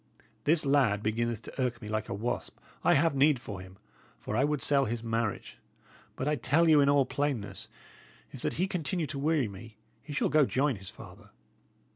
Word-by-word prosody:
This 155 0 +3
lad 130 -8 +3
beginneth 115 +1 -1
to - - -6
irk 125 -2 -1
me 110 - -9
like 110 0 -3
a - - -2
wasp. 115 +4 -3 0.3
I - - +5
have 165 -2 +3
a - - -4
need 140 -1 +4
for 105 -7 -7
him, 95 +1 -13 0.4
for 105 - -5
I 130 - +3
would 150 -2 0
sell 140 -2 +3
his 115 +1 -3
marriage. 115 -2 -3 0.6
But 135 - -3
I 150 0 +1
tell 145 +7 +2
you, 155 -2 +6
in 140 - +4
all 140 -1 +4
plainness, 140 -8 -3 0.6
if - - -10
that - - -1
he 180 - 0
continue 180 -2 -2
to 140 -1 -5
weary 150 -3 +1
me, 105 +2 -11 0.2
he 150 - -10
shall 145 - 0
go 150 -3 +4
join 135 -2 +1
his 95 -1 -9
father. - - -13
135 Hz, 205 wpm, -30 LUFS, 110-150 Hz, 0.6 s, you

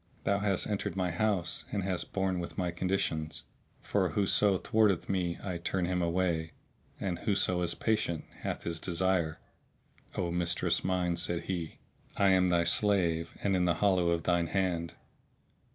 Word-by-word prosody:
Thou 100 0 +1
hast 100 -2 +1
entered 105 -2 -2
my 90 -2 0
house 90 -1 0
and 100 -2 -1
hast 95 -2 -2
borne 95 -2 0
with 85 - -6
my 90 -2 0
conditions, 85 -3 -1 0.4
for 95 -3 +1
whoso 100 +3 +3
thwarteth 105 -3 +2
me 90 -3 -1
I 90 -3 -3
turn 90 +1 -1
him 90 0 0
away, 85 -2 0 0.5
and 90 -3 -2
whoso 95 -4 +1
is 85 - 0
patient 105 -8 0
hath - - -4
his 85 -1 -3
desire." 90 -2 0 0.8
"O 85 -1 -1
mistress 85 0 +1
mine," 90 -2 0
said 85 0 0
he, 85 -4 -4 0.4
"I 100 -1 +4
am 95 -1 +4
thy 85 -1 +3
slave 85 -3 +2
and 100 -2 +2
in 90 -1 +2
the 85 -2 +2
hollow 95 -2 +2
of 85 -1 0
thine 85 -1 +2
hand!" 85 -2 -1
90 Hz, 160 wpm, -31 LUFS, 85-95 Hz, 0.8 s, I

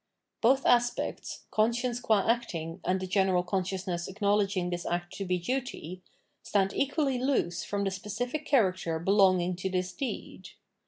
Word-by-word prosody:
Both 265 +4 +4
aspects, 240 0 +1
conscience 235 +3 +1
qua 220 -5 +2
acting, 175 -7 -1
and 185 +1 +1
the 185 - -3
general 185 -1 +2
consciousness 185 -1 -2
acknowledging 200 -2 +1
this 175 -1 -3
act 175 0 -3
to 195 - -3
be 180 0 +1
duty, 185 - -4 0.4
stand 195 -1 +1
equally 275 -2 0
loose 245 -10 0
from 200 -1 -2
the 195 - 0
specific 245 +9 -3
character 185 - +2
belonging 185 0 +3
to 190 +1 -2
this 180 -1 -2
deed. 265 +7 -5
195 Hz, 145 wpm, -29 LUFS, 180-240 Hz, 0.4 s, Both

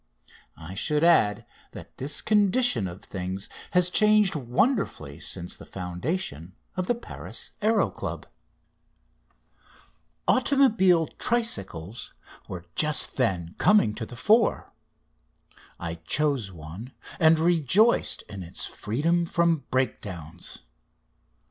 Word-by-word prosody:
I 80 +4 -9
should 150 +10 0
add 135 -12 +4 0.3
that - - -12
this 140 +3 0
condition 210 - +3
of 90 +2 -9
things 95 +1 -5 0.3
has 180 0 +4
changed 210 -2 +4
wonderfully 125 - -1
since 85 +1 -4
the - - -12
foundation 90 - -5 0.2
of 185 -1 -2
the 245 - +2
Paris 235 - -7
Aéro 220 +1 +2
Club. - - -5 2.0
Automobile 225 - +4
tricycles 115 - -2 0.3
were 90 -2 -7
just 155 -1 +1
then 90 -10 0
coming 205 - +4
to 110 0 -6
the 120 - -10
fore. 215 - +2 1.1
I 85 -1 -4
chose 115 - 0
one, 85 +9 -10 0.3
and 160 0 +5
rejoiced 175 - +3
in 100 -2 -9
its 85 -1 -3
freedom 165 +10 -1
from 170 -5 +1
breakdowns. 90 - -4
135 Hz, 105 wpm, -26 LUFS, -, 2.0 s, and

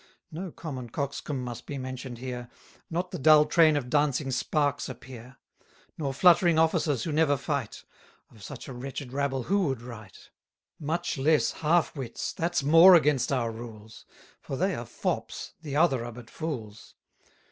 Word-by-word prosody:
No 175 +3 -6
common 130 -8 -7
coxcomb 140 +1 -4
must 120 -2 -7
be 145 - -5
mentioned 130 -1 -6
here: 125 -1 -6 0.4
Not 175 +2 -3
the - - -5
dull 150 +1 +7
train 155 0 +4
of 130 -4 -3
dancing 145 -1 +1
sparks 145 +2 0
appear; 125 0 -11 0.2
50 - - -34 0.3
Nor 140 -3 -2
fluttering 175 0 +5
officers 160 -5 +2
who 165 - -3
never 150 -2 +3
fight; 140 -6 -4 0.5
Of 110 - -17
such - - -9
a 135 - -7
wretched 130 +1 -7
rabble 135 -2 -1
who 195 +4 +1
would 130 -4 -3
write? 110 -5 -12 0.5
Much 160 0 -2
less 155 +3 +3
half 165 +2 +1
wits: 130 -5 -5
that's 170 -2 -1
more 165 +6 +8
against 150 -6 +3
our 120 -4 0
rules; 110 -1 -11 0.3
For - - -5
they - - +1
are - - -5
fops, - - -4
the 145 -4 -5
other 145 -6 +3
are 120 - -6
but 115 0 -12
fools. 115 -10 -6
140 Hz, 165 wpm, -28 LUFS, 125-155 Hz, 0.5 s, more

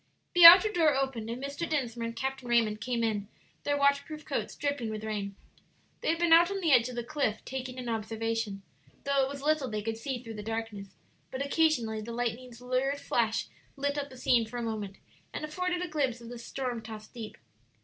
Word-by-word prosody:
The 350 -1 +8
outer 375 +5 +11
door 320 -7 +3
opened, 265 -5 -2
and 245 +3 -5
Mr. 285 +4 -4
Dinsmore 240 -6 -1
and 230 - -6
Captain 265 +1 -4
Raymond 225 -3 +2
came 240 -1 -1
in, 210 -3 -1 0.4
their 290 0 +1
waterproof 280 +2 +1
coats - - -3
dripping 285 -5 -2
with 215 0 -5
rain. 205 -2 -4 0.7
They - - -1
had 330 - +2
been 340 -1 +4
out 340 +1 +7
on 395 0 -2
the 335 -5 +1
edge 250 -2 +5
of 250 - -7
the 240 - -3
cliff 245 -5 -2
taking 255 -1 -5
an 250 -1 -6
observation, 225 -2 -2 0.4
though 280 0 +2
it 265 - 0
was 280 0 -7
little 300 -3 +1
they 215 -1 -3
could 225 0 -3
see 250 +1 -4
through 225 -2 -7
the 210 - -6
darkness; 225 -2 -4 0.4
but 265 +2 -3
occasionally 270 -8 +1
the 230 +2 -7
lightning's 240 +1 -4
lurid 255 +3 0
flash 230 -4 0 0.3
lit 285 0 -1
up 285 -1 -3
the 260 - -12
scene 240 -2 +2
for 245 +2 -7
a 240 - -3
moment, 210 -4 -4 0.4
and - - -3
afforded 360 +3 -2
a - - -3
glimpse 275 -7 -1
of 235 -1 -11
the 240 -1 -8
storm 245 -1 -4
tossed 215 -1 -10
deep. 225 -3 -8
250 Hz, 210 wpm, -29 LUFS, 225-285 Hz, 0.7 s, outer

